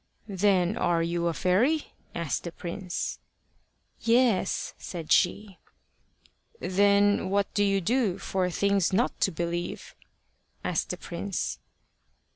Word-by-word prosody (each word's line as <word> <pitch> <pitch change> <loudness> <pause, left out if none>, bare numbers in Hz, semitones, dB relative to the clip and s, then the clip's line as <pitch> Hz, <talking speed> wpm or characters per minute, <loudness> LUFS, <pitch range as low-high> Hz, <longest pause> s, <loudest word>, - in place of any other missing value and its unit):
"Then 195 -1 +2
are 170 -1 +2
you 170 0 -1
a 170 - 0
fairy?" 245 - +1 0.2
asked 170 -4 -2
the 170 - -4
prince. 175 +2 -4 0.8
"Yes," 230 -4 +2
said 165 -4 -7
she. 195 +1 +2 1.0
"Then 200 0 +3
what 200 +1 0
do 205 - +2
you 195 -1 +2
do 220 -1 +1
for 185 -1 -1
things 200 +1 +1
not 230 +7 +1
to 195 - +2
believe?" 170 +1 -4 0.7
asked - - -1
the - - -3
prince. - - -4
190 Hz, 115 wpm, -27 LUFS, 175-205 Hz, 1.0 s, Then